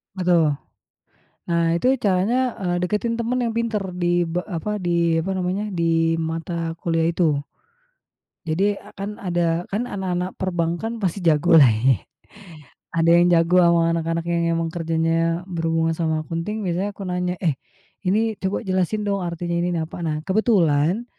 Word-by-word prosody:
Betul. 175 -5 +2 0.9
Nah 170 -1 +2
itu 255 +10 +2
caranya, 225 +5 +1
eee, 175 -2 0
dekatin 210 +6 -1
teman 240 +2 -1
yang 235 - 0
pintar 230 -3 0 0.2
di 175 0 +2
be 180 +2 -2
apa, 210 +3 -3
di 170 -3 +1
apa 180 +4 -1
namanya, 185 +2 -1
di 165 -1 +2
mata 165 +1 -3
kuliah 165 -1 0
itu. 165 -4 +1 1.0
Jadi, 190 +6 +1 0.2
kan 205 +1 -5
ada 175 -2 -1
kan 235 +5 -1
anak-anak 185 -3 -3
perbankan 185 +5 -2
pasti 190 -1 -2
jago 165 +1 +4
lah 150 - +9
ya. 120 +4 +3 1.0
Ada 165 0 +3
yang 175 0 +4
jago 170 +2 +4
sama 170 -1 +3
anak-anak 165 0 -1
yang 170 0 +1
memang 165 0 -1
kerjanya 165 0 0
berhubungan 165 -1 0
sama 160 -2 0
accounting 170 +7 -4
biasanya 185 +4 -1
aku - - -8
nanya, 180 0 -1
"Eh, 165 -6 +1 0.5
ini 220 +3 +2
coba 190 +1 -1
jelasin 190 +2 0
dong 200 -1 0
artinya 170 0 -3
ini 175 - 0
nih 165 - 0
apa." 175 - -8
Nah, 155 -1 -1
kebetulan 190 -2 +2
175 Hz, 155 wpm, -22 LUFS, 165-195 Hz, 1.0 s, lah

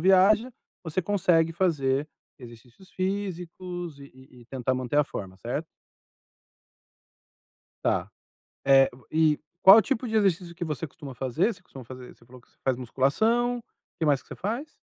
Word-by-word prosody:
viaja, 195 +7 +4 0.3
você 160 +3 -1
consegue 170 -4 +2
fazer 150 -5 +1 0.3
exercícios 120 +8 -15
físicos, 180 -4 -4
e 140 - -10
e 130 -1 -17
e - - -21
tentar 130 0 -2
manter 130 +2 -2
a 150 - +5
forma, 95 -8 -7
certo? 125 - -4 2.2
Tá. - - 0 0.6
Eh, 135 -1 +6
o 125 - -20
e 155 -1 +3 0.2
qual 190 +1 +10
o 225 - +7
tipo 255 -1 -2
de 220 - -3
exercício 180 -4 +1
que 175 - -4
você 155 -1 -3
costuma 140 -1 -10
fazer? 135 - 0
Você 185 - -19
costuma 135 -7 -12
fazer 125 +1 -11
você - - -23
falou 125 +2 -14
que - - -29
você - - -35
faz 130 -2 +1
musculação. 220 - +1
O 235 - -10 0.4
que 165 - +1
mais 145 -3 +3
que - - -27
você - - -7
faz? 235 +10 -3
160 Hz, 170 wpm, -26 LUFS, 130-190 Hz, 2.2 s, qual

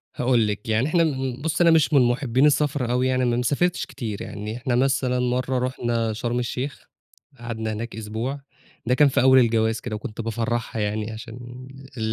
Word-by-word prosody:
هاقول 120 -3 +2
لِك 105 +1 -4
يعني، 110 +5 +2
إحنا 165 +1 +3
م 135 -4 -2
بُصّي، 160 +2 +1
أنا 165 - +6
مش 160 -2 +3
من 140 - +6
مُحبين 125 +2 +2
السَفر 145 -4 +1
أوي 125 +1 +2
يعني، 130 0 +1
أنا 120 -1 +1
ما 120 - 0
سافرتش 165 +8 0
كتير 110 -4 -6
يعني. 105 +2 -6
إحنا 125 0 -1
مثلًا 130 -1 +1
مرّة 125 +1 0
رُحنا 120 -3 -1
شرم 120 +2 -2
الشيخ، 125 +3 -3 0.6
قعدنا 110 -2 -4
هناك 115 +2 -5
أسبوع، 110 +6 -4 0.5
ده 125 - +2
كان 145 +2 +6
في 135 - +2
أول 130 +1 +7
الجواز 115 -2 +2
كده، 115 -3 -5
وكنت 110 0 -6
بافرّحها 115 0 -2
يعني 105 +1 -2
عشان 120 +3 -9 0.3
ال - - -5
125 Hz, 190 wpm, -24 LUFS, 115-130 Hz, 0.6 s, أول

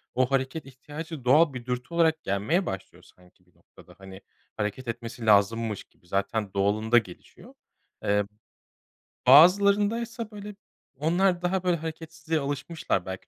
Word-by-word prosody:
o 130 +1 +1
hareket 135 +4 -1
ihtiyacı 145 +2 -9
doğal 145 +4 +5
bir 125 -2 -7
dürtü 125 +5 -4
olarak 160 -1 +2
gelmeye 105 - 0
başlıyor 95 - -7
sanki 90 0 -23
bir 90 - -33
noktada. 90 - -19
Hani, 95 0 -12 0.4
hareket 105 +5 -3
etmesi 115 0 -6
lazımmış 105 +1 +2
gibi 85 - -30
zaten 100 +2 -2
doğalında 105 +4 +2
gelişiyor. 95 -7 -5 0.5
Eee, 105 0 +1 1.0
bazılarındaysa 205 - +5
böyle 205 0 -9 0.4
onlar 175 +5 +1
daha, 180 +1 -1
böyle, 180 -2 +1
hareketsizliğe 160 0 -4
alışmışlar 145 - -3
belki 95 0 -7
135 Hz, 130 wpm, -26 LUFS, 105-170 Hz, 1.0 s, doğal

